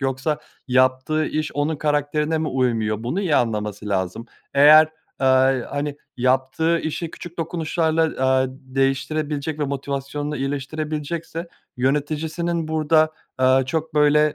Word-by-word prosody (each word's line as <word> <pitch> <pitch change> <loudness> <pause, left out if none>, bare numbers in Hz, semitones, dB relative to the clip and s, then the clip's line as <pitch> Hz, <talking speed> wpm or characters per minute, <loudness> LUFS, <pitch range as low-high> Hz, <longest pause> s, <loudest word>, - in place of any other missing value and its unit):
yoksa 135 +3 -1 0.3
yaptığı 130 +4 +2
iş 155 0 -2
onun 145 +2 0
karakterine 150 +1 0
mi 155 0 -1
uymuyor? 115 -4 0
Bunu 150 +12 -1
iyi 165 -7 +2
anlaması 105 -3 -1
lazım. 95 +4 -2 0.3
Eğer, 155 +2 +8 0.3
aaa, 130 0 +4
iii, 130 -2 -2
hani, 145 0 -3 0.2
yaptığı 130 +6 +1
işi 160 +1 -3
küçük 175 0 -10
dokunuşlarla, 165 -1 0 0.2
aaa, 130 0 +3
d 130 0 -15
değiştirebilecek 145 +3 -1
ve 145 - 0
motivasyonunu 140 +2 -3
iyileştirebilecekse 155 +4 -4 0.3
yöneticisinin 155 +5 -1
burada, 155 0 +3 0.3
aaa, 130 0 +4
çok, 160 +3 -3
böyle, 150 0 +4
145 Hz, 125 wpm, -22 LUFS, 130-155 Hz, 0.3 s, Eğer